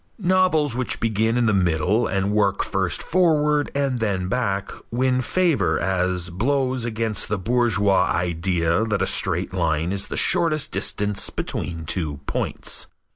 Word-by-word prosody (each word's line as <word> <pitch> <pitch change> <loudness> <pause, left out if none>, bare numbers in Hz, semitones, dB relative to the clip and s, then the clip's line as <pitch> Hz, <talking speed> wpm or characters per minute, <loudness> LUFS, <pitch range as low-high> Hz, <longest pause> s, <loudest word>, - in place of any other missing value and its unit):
Novels 180 - +2
which 125 0 0
begin 110 +1 0
in 120 - +2
the 110 - +2
middle 90 +3 +1
and 95 +1 -1
work 100 -2 +1
first 95 -2 -1
forward 150 -4 +2
and 135 -3 0
then 95 -5 -1
back, 100 -4 -2 0.2
win 130 +1 +1
favor 155 - +1
as 90 -1 -1
blows 130 +5 -1
against 110 -2 -2
the 105 - 0
bourgeois 105 -2 +2
idea 85 +1 0
that 105 -4 -1
a - - +2
straight 95 -1 0
line 80 -2 0
is 100 0 -3
the - - -5
shortest 165 -4 +3
distance 105 -1 -1
between 80 -2 -4
two 80 -3 -2
points. - - -2
105 Hz, 145 wpm, -22 LUFS, 90-130 Hz, 0.2 s, shortest